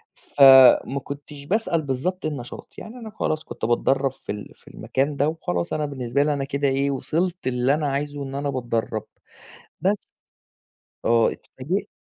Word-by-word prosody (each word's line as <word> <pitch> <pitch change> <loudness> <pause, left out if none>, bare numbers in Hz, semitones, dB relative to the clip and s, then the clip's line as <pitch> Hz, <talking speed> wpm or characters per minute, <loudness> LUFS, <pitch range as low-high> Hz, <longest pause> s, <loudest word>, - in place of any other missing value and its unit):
فما 135 0 +6
كنتش 140 0 -9
باسأل 185 -2 0
بالضبط 155 +7 -2
النشاط 140 -6 -6
يعني 220 - -9
أنا 230 -3 -8
خلاص 155 -7 -2
كنت - - -5
باتدرب 135 +3 +2
في 135 - -8
ال 105 0 -7
في - - -27
المكان 140 +2 -2
ده 145 - +2
وخلاص 90 - -2
أنا 150 - 0
بالنسبة 140 -1 -1
لي 150 0 +1
أنا 140 -1 -2
كده 140 +1 -1
إيه 135 +1 +1
وصلت 165 +6 -2
اللي 125 +1 +2
أنا 150 0 0
عايزه 145 +1 -3
إن 135 0 -6
أنا 140 +1 -2
باتدرب 120 -4 -2 0.8
بس 195 +5 +2 1.1
آه 115 -1 +4
إتفاجئت. 180 +10 -4
140 Hz, 160 wpm, -23 LUFS, 130-155 Hz, 1.1 s, فما